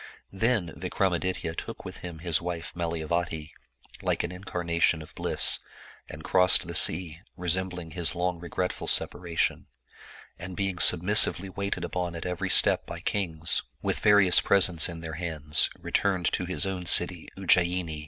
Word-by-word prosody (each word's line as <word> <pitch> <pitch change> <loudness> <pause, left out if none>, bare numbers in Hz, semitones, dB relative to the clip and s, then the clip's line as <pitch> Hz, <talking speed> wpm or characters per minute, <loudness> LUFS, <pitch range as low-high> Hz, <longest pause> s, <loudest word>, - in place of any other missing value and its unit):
Then 105 -5 -1
Vikramaditya 90 -3 -3
took - - -8
with - - -8
him 85 -2 -9
his 85 -3 +1
wife 85 -1 -6
Malaya 85 -2 -4
vati, 80 -1 -4 0.5
like - - -1
an 85 - -5
incarnation 85 -3 -2
of 75 - -16
bliss, - - +3 0.5
and 80 - -10
crossed 95 +1 +3
the 85 - -7
sea 85 -1 +4 0.2
resem 90 +1 -1
bling 90 -3 -9
his 85 +2 0
long 90 0 -2
regretful 90 +1 -5
separation, 85 -2 0 0.7
and 90 0 -8
being 95 -3 -3
submissively 95 +2 +5
waited 100 +1 -5
upon 90 -1 -4
at 85 - -7
every 90 -2 -4
step - - +5
by - - -8
kings, 80 -6 -2 0.2
with - - -2
various 100 -3 +5
presents 90 -4 +3
in 85 -1 -9
their 80 -1 -7
hands, 75 -3 +2
returned 95 -4 -1
to 90 - -3
his 95 +2 -1
own 95 -2 -5
city 90 -1 +4
Ujjayini. 90 -4 0
90 Hz, 155 wpm, -26 LUFS, 85-95 Hz, 0.7 s, submissively